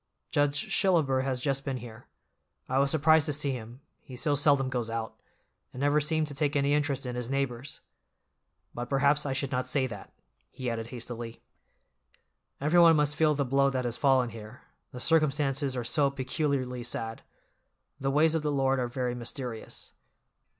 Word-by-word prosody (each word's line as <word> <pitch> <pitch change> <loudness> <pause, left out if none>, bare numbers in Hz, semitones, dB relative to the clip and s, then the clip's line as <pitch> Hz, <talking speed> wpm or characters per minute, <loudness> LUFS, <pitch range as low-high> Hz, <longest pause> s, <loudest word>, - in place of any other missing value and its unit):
"Judge 145 0 +1
Shillaber 160 -9 +3
has 130 -1 -2
just 135 +1 -1
been 135 -2 -3
here. 115 -2 -11 0.6
I 130 +1 +1
was 140 0 +3
surprised 160 +1 +4
to 150 - 0
see 145 -1 +1
him, 120 +1 -7 0.2
he 130 - -11
so 145 +4 +1
seldom 140 -2 +3
goes 125 -3 -2
out, 115 -1 -4 0.5
and 125 - -9
never 145 +1 +3
seemed 155 +1 +1
to - - -7
take 145 +1 -1
any 140 0 +2
interest 145 -3 0
in 125 -1 -4
his 125 -1 -4
neighbors. 135 -1 -3 0.9
But 120 0 -5
perhaps 140 +1 +2
I 135 - -1
should 140 0 -2
not 125 -1 -1
say 130 0 +1
that," 105 -6 -8 0.4
he 125 -2 -4
added 115 -1 -4
hastily. 120 -1 -7 1.2
"Everyone 165 +3 +6
must 150 -1 +2
feel 155 -1 +3
the 140 -1 0
blow 140 +2 +3
that 130 -2 -2
has 120 -1 -1
fallen 130 -3 +3
here; 110 +2 -11 0.3
the 125 - -8
circumstances 145 -3 +1
are 120 - -2
so 140 +4 +1
peculiarly 135 -2 -2
sad. 115 -1 -4 0.8
The 135 - -1
ways 155 +3 +3
of 160 - +1
the 150 -1 -1
Lord 135 -1 +1
are 125 - 0
very 125 0 -2
mysterious." 120 -1 -5
135 Hz, 175 wpm, -29 LUFS, 125-145 Hz, 1.2 s, Everyone